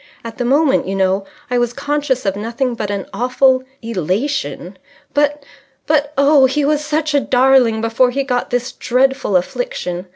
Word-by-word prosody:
"At 230 +1 -8
the 245 - -1
moment, 275 - +2
you 195 - -2
know, 190 +1 +1 0.3
I 245 - +2
was 240 0 0
conscious 285 -3 -2
of 195 -1 0
nothing 230 +4 -2
but 215 -3 -4
an 200 -1 -3
awful 255 +1 +2 0.2
elation. 210 - -3 0.3
But 290 0 +1 0.4
but 290 -1 +1
oh, 280 -1 +5
he 285 +2 0
was 300 0 +1
such 310 0 -1
a 285 - +4
darling 255 -4 +3
before 230 +3 +2
he 275 +3 -1
got 250 -2 -2
this 245 +1 -2
dreadful 260 -3 0
affliction. 180 - -4
255 Hz, 165 wpm, -17 LUFS, 225-285 Hz, 0.4 s, oh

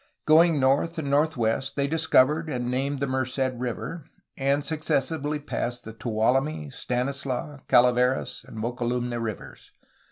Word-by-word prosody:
Going 160 0 +5
north 140 +6 +2
and 145 -3 -2
northwest 135 -5 +1
they 140 - +1
discovered 155 0 +3
and 125 -3 -2
named 135 +3 -1
the 140 - -1
Merced 130 0 -1
River, 125 +5 -5 0.3
and 140 +1 0
successively 150 -1 -1
passed 120 -4 -4
the 110 - -8
Tuolumne, 135 +7 0
Stanislaus, 135 +2 -3
Calaveras, 125 +1 +3
and - - -10
Mokelumne 120 +1 -2
rivers. 110 -3 -7
135 Hz, 125 wpm, -26 LUFS, 125-150 Hz, 0.3 s, Going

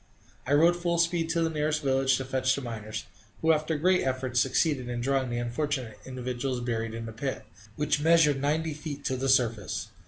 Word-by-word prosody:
I 140 - +2
rode 165 +4 +5
full 175 -1 -1
speed 170 -1 +1
to 165 0 +1
the 165 - +1
nearest 150 0 -1
village 135 -1 +2
to 130 - -4
fetch 130 0 +1
the 140 - -4
miners, 110 -2 -5 0.4
who 160 - +5
after 155 0 +1
great 180 +4 +3
efforts 130 -1 0
succeeded 135 -2 +1
in 120 0 -3
drawing 135 +1 0
the 120 - -2
unfortunate 120 0 -3
individuals 125 0 -3
buried 115 -2 -2
in 115 0 -5
the 115 - -7
pit 130 +4 -4 0.3
which 150 0 0
measured 155 -3 +4
ninety 155 +2 0
feet 145 -1 -7
to 130 - 0
the 135 +1 -1
surface. 115 -6 +1
135 Hz, 195 wpm, -28 LUFS, 125-155 Hz, 0.4 s, rode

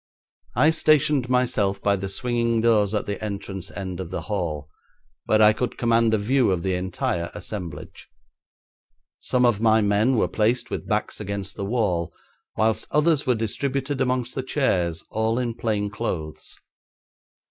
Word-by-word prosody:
I 155 - +5
stationed 150 -5 +3
myself 110 -6 +1
by 100 0 +2
the 95 0 -4
swinging 115 +1 0
doors 110 -3 +3
at 105 - -1
the 100 +1 -4
entrance 100 -3 -5
end 95 -2 -6
of 90 -3 -5
the 95 - -4
hall, 85 -8 -3 0.6
where 110 0 +4
I 105 0 +7
could 125 +2 -3
command 115 -1 +3
a - - +1
view 120 +3 +2
of 90 -3 0
the 95 - 0
entire 90 -2 -2
assemblage. 85 -5 -7 1.1
Some 125 -1 +1
of 115 -4 +2
my 110 -1 +5
men 105 +5 +2
were 110 - +2
placed 120 +2 0
with - - -4
backs 105 -1 -1
against 100 -2 -5
the 100 - -4
wall, 95 -7 0 0.5
whilst 110 0 +1
others 150 -1 +2
were 125 - +4
distributed 135 +5 -2
amongst 125 -1 0
the 130 - -2
chairs, 90 - 0
all 110 +1 0
in 120 -2 -1
plain 105 -3 -1
clothes. 80 -9 -5
110 Hz, 160 wpm, -24 LUFS, 95-125 Hz, 1.1 s, I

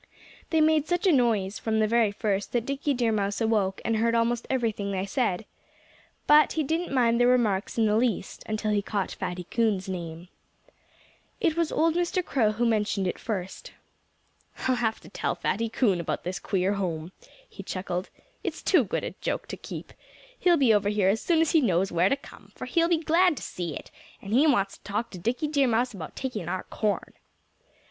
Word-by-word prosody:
They 320 -1 +3
made 310 -1 +3
such 350 +2 0
a 375 - +6
noise, 220 - +2
from 220 -1 -1
the 215 - +3
very 230 -2 +3
first, 205 -1 -2
that 240 -1 0
Dickie 280 +1 -1
Deer 240 -2 +1
Mouse 200 -2 -1
awoke 210 -4 +1
and 225 -1 +1
heard 230 +1 +2
almost 235 +1 +1
everything 220 -6 -1
they 190 0 -1
said. 210 -2 -1 0.8
But 300 +1 +6
he 315 - 0
didn't 325 +4 -1
mind 235 -3 +3
their 245 - +5
remarks 225 -6 +1
in 225 - +3
the 210 0 +2
least 235 0 -1
until 215 0 -1
he 205 -1 +2
caught 200 -1 -2
Fatty 180 0 -4
Coon's 215 -5 +1
name. 170 -2 -6 1.1
It 320 - +1
was 335 -2 0
old 325 0 +2
Mr. 350 +1 0
Crow 220 -6 +1
who 235 +3 0
mentioned 210 -3 +1
it 180 - -2
first. 190 -4 -5 0.9
"I'll 260 - +3
have 220 -2 0
to - - -14
tell - - -2
Fatty 230 +2 -1
Coon 215 -5 +2
about 170 - -3
this 180 +1 -3
queer 190 0 0
house," 175 -4 -3 0.4
he - - -10
chuckled. 185 -1 -4 0.3
"It's - - -4
too 355 -8 +4
good 205 - -3
a - - -3
joke - - -2
to - - -4
keep. - - -8 0.5
He'll 350 -2 +4
be 260 -6 +4
over 205 -1 +2
here 205 -2 +2
as 215 +3 +1
soon 330 -2 +2
as 325 - +2
he 320 - +4
knows 190 -5 +1
where 175 +3 +3
to - - +3
come, - - -15
for - - -6
he'll 335 -1 +2
be 340 - +4
glad 330 +1 +3
to - - -6
see 170 -5 -4
it; - - -9 0.3
and 200 +1 -6
he 280 +6 +5
wants 200 -9 +1
to - - -39
talk 210 +4 -3
to 185 - -8
Dickie 245 - -1
Deer 285 -3 +2
Mouse 240 +1 +1
about 170 -6 -8
taking 215 -10 -4
our 185 +1 -2
corn." 210 -2 -2
225 Hz, 205 wpm, -27 LUFS, 195-265 Hz, 1.1 s, a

